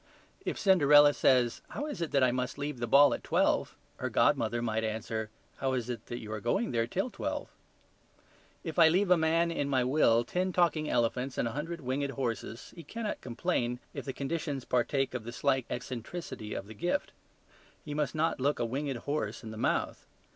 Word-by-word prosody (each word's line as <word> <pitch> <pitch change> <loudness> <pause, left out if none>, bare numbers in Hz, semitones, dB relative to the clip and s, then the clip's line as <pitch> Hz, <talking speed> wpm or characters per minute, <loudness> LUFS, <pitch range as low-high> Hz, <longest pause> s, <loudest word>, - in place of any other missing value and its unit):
If - - -3
Cinderella 145 -6 +6
says, 125 -4 +3
"How 290 - -4
is 295 - -5
it 165 - -1
that 140 -2 +3
I 125 - +4
must 125 +2 -2
leave 145 -2 -4
the 120 - -2
ball 140 +2 +7
at - - -5
twelve?" - - +1 0.2
her - - -2
godmother 115 +1 +2
might 110 -1 -1
answer, 110 0 -3 0.3
"How 135 -1 -1
is 125 -1 -2
it 120 - -7
that 120 - -4
you 110 -2 -8
are 110 - -3
going 120 +2 0
there 115 -1 +1
till 195 - -2
twelve?" - - -4 1.1
If 160 0 -3
I 165 - +9
leave 185 +3 +2
a - - +9
man 165 +1 +2
in 145 -4 -1
my 130 -2 +2
will 125 -3 +4
ten 180 +9 -1
talking 165 -4 +2
elephants 125 +2 0
and - - +1
a - - -3
hundred 165 +6 -4
winged 135 +2 -1
horses, 115 -2 -4
he 170 - -8
cannot 220 +4 -5
complain 125 -1 -1 0.2
if - - -6
the 135 - -2
conditions 140 -1 -3
partake 135 +2 +1
of 125 -3 -4
the 120 - -6
slight 130 0 0
eccentricity 125 -1 -5
of - - -4
the 110 - -10
gift. 175 - -1 0.7
He 150 - -5
must 145 -3 -1
not 160 -1 +1
look 145 +2 +2
a - - 0
winged 135 +2 -2
horse 120 -4 -3
in 110 - -7
the - - -7
mouth. 110 - -1
135 Hz, 200 wpm, -30 LUFS, 120-155 Hz, 1.1 s, I